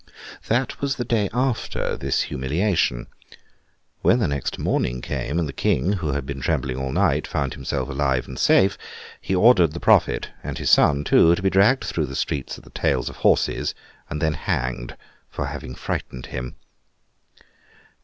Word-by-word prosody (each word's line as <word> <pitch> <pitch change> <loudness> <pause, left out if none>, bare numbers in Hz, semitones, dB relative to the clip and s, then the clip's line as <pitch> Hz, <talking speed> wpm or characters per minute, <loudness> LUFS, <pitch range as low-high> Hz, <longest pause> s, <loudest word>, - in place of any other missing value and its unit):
That 125 +4 0
was 140 -1 0
the 120 - -3
day 110 -4 +1
after 125 0 -1
this - - 0
humiliation. 75 - 0 1.0
When 120 - +4
the 115 - +1
next 70 -1 -3
morning 60 0 -1
came, 75 +5 -3
and 85 -3 0
the 70 - -6
King, 80 +11 +1
who 80 -8 -2
had 70 -1 -2
been 70 0 -6
trembling 65 -2 -1
all 65 0 -3
night, - - +1
found - - -2
himself 65 - -3
alive 65 -2 0
and 65 - -8
safe, 95 +1 +4 0.4
he 95 - -1
ordered 90 -6 +5
the 85 - -5
prophet—and - - +1
his - - 0
son 70 0 +5
too—to 85 +4 +4
be 95 - +2
dragged 100 +8 +4
through 80 -3 -2
the 65 - -7
streets 70 -1 -3
at - - -15
the - - -17
tails - - 0
of - - -11
horses, - - +1 0.3
and 75 - -4
then 80 0 +1
hanged, 60 -4 -3 0.3
for - - -4
having 65 - -6
frightened 60 0 -5
him. 65 0 -6
75 Hz, 165 wpm, -23 LUFS, 65-95 Hz, 1.0 s, ordered